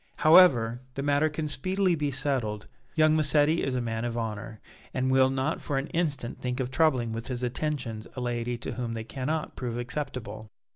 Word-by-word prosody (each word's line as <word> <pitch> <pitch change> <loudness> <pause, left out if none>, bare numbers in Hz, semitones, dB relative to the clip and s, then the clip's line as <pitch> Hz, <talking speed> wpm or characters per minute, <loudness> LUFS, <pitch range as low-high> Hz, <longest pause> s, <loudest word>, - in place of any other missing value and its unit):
However, 130 -9 +6
the 140 - -3
matter 145 +2 +3
can 155 0 -3
speedily 185 +6 0
be 150 -3 0
settled. 130 -6 -1 0.3
Young 155 -1 +5
Massetti 155 +1 +3
is 135 -2 -1
a 125 - 0
man 115 -1 -2
of 120 -1 -2
honor, 110 -1 -4 0.4
and 130 0 +1
will 130 0 +5
not 135 +4 -1
for 145 - -2
an 135 - -1
instant 145 -8 -2
think 125 0 -2
of 130 -1 -2
troubling 130 -6 +2
with 115 +1 -5
his 125 -1 -3
attentions 125 -4 -3
a - - -4
lady 120 -1 -2
to 120 - -5
whom 120 -2 -4
they 110 - -4
cannot 145 +6 -3
prove 120 -2 -4
acceptable." 120 -3 -5
130 Hz, 190 wpm, -28 LUFS, 120-150 Hz, 0.4 s, However